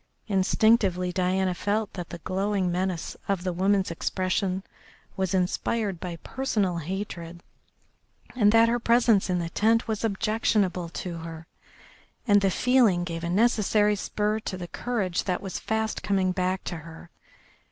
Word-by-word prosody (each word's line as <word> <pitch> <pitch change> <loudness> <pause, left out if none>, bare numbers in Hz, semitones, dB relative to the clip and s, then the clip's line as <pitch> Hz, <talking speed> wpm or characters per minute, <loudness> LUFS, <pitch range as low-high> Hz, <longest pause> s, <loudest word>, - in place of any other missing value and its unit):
Instinctively 195 -2 +2
Diana 185 +1 +1
felt 205 +3 -1
that 175 -3 -6
the 170 - -6
glowing 190 +1 -1
menace 180 -1 -2
of 195 -3 -1
the 185 -1 -1
woman's 190 +1 +1
expression 185 +2 -1 0.5
was 190 -1 -1
inspired 190 +1 -1
by 175 -1 -5
personal 210 -9 -1
hatred, 170 -1 -6 0.9
and 210 -4 +4
that 225 +1 +6
her 240 +1 +1
presence 230 -4 +3
in 180 - +1
the 170 -1 -3
lent 225 +2 +3
was 220 -1 -2
objectionable 210 -4 0
to 170 0 -5
her. 165 0 -8 0.8
And 205 -1 +5
the 195 - +3
feeling 230 -4 +3
gave 165 -1 -5
a 170 - -2
necessary 210 0 +3
spur 210 +1 -1
to 190 -3 -5
the 175 -1 -6
courage 200 -5 -2
that 180 -2 0
was 195 -3 -5
fast 220 0 -2
coming 190 -2 +1
back 185 0 -1
to 175 - -4
her. 165 +1 -12
190 Hz, 150 wpm, -26 LUFS, 180-215 Hz, 0.9 s, that